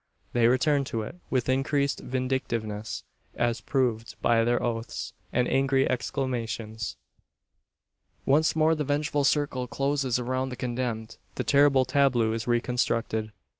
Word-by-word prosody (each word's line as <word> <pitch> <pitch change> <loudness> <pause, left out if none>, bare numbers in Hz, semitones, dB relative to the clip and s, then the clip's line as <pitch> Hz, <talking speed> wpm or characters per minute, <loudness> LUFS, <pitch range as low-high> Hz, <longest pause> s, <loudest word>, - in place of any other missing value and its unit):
They 120 -1 +4
return 140 +3 +3
to 115 -3 -3
it 140 - -8
with 130 -2 0
increased 140 +2 +1
vindictiveness 120 -5 -3 0.3
as 120 -1 0
proved 120 -5 -1
by 115 -1 +3
their 120 +1 +2
oaths, 115 -1 -3 0.2
and 125 0 +1
angry 135 0 +2
exclamations. 115 -4 -3 1.3
Once 155 +4 +3
more 160 0 +4
the 155 -2 -1
vengeful 145 0 0
circle 140 -3 +1
closes 135 -1 0
around 130 +1 -1
the 125 - -5
condemned 120 -3 -3 0.2
the - - -2
terrible 140 -2 +4
tableau 130 -4 +2
is 115 +1 -4
reconstructed. 120 -2 0
125 Hz, 130 wpm, -27 LUFS, 115-135 Hz, 1.3 s, They